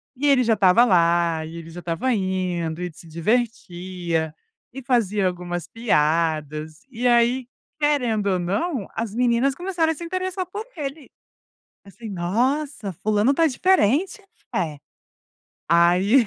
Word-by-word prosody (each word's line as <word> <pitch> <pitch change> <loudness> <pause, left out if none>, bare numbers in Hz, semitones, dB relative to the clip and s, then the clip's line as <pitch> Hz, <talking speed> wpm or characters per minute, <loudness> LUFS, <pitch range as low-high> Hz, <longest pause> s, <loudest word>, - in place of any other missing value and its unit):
e 275 - -3
ele 270 -3 +5
já 225 -1 +3
estava 200 +4 +5
lá 170 -4 +2
e 165 +1 -8
ele 165 0 -9
já 170 +2 -9
estava 175 +10 -1
indo 180 -4 -2
e 180 - -3
se 170 - -14
divertia, 175 -4 -2 0.4
e 270 - -7
fazia 215 -6 +1
algumas 175 -1 -4
piadas, 155 -6 0
e 245 0 -4
aí 240 +1 +3 0.3
querendo 245 -9 +1
ou 185 -2 +1
não, 205 - -2
as 225 -3 -3
meninas 245 +3 +2
começaram 350 -2 0
a 320 - -3
se 340 - -7
interessar 370 +1 -3
por 410 +4 -6
ele. 285 0 -6 0.7
Assim: 205 +3 -11
"Nossa, 220 - -1
fulano 215 +4 +3
está 325 +3 +3
diferente", 365 - +2 0.3
eh, 155 -3 -1 0.9
aí, 180 +8 +4
210 Hz, 135 wpm, -23 LUFS, 175-265 Hz, 0.9 s, ele